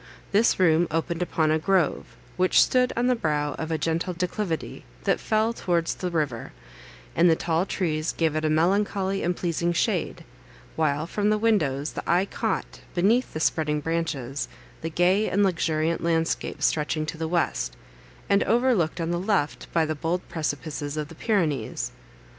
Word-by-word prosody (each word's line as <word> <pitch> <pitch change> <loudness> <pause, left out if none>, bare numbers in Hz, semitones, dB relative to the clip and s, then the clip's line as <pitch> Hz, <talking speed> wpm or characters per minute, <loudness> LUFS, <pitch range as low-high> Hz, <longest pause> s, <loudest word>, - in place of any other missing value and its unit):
This 215 +1 +3
room 170 -1 +4
opened 165 +2 -2
upon 160 -3 +1
a 155 - +2
grove, 185 0 0 0.2
which 185 0 +4
stood 250 -1 +4
on 240 - +2
the 250 - +4
brow 150 -9 -1
of 160 - -3
a 160 - 0
gentle 165 +3 -1
declivity, 180 -1 -3 0.2
that - - +2
fell 220 +1 +1
towards 170 -6 0
the 180 - -4
river, 150 -9 -2 0.6
and 175 - +5
the 165 - +5
tall 165 +3 0
trees 155 -5 -1
gave 160 -2 0
it 155 - -1
a 155 - +2
melancholy 195 +4 +1
and 175 +1 0
pleasing 170 0 0
shade; - - -1 0.5
while 155 -1 +1
from 205 +4 0
the 215 - +3
windows 155 -11 +1
the - - -5
eye 180 +3 +3
caught, - - -3 0.2
beneath 215 +8 +2
the 155 - -3
spreading 150 -1 +1
branches, 145 -4 -2 0.3
the 160 - -3
gay 180 +6 +2
and 200 +2 +2
luxuriant 165 -3 0
landscape 165 -1 -1
stretching 155 0 +1
to 155 - -5
the 160 - -1
west, 110 - -1 0.5
and 200 0 +3
overlooked 230 -9 +2
on 165 0 -1
the 175 - 0
left 185 -6 -1
by 165 -1 +2
the 155 - -1
bold 165 +4 -2
precipices 150 -1 -3
of 150 0 -3
the 165 - -11
Pyrenees. 160 - -1
165 Hz, 170 wpm, -25 LUFS, 155-190 Hz, 0.6 s, and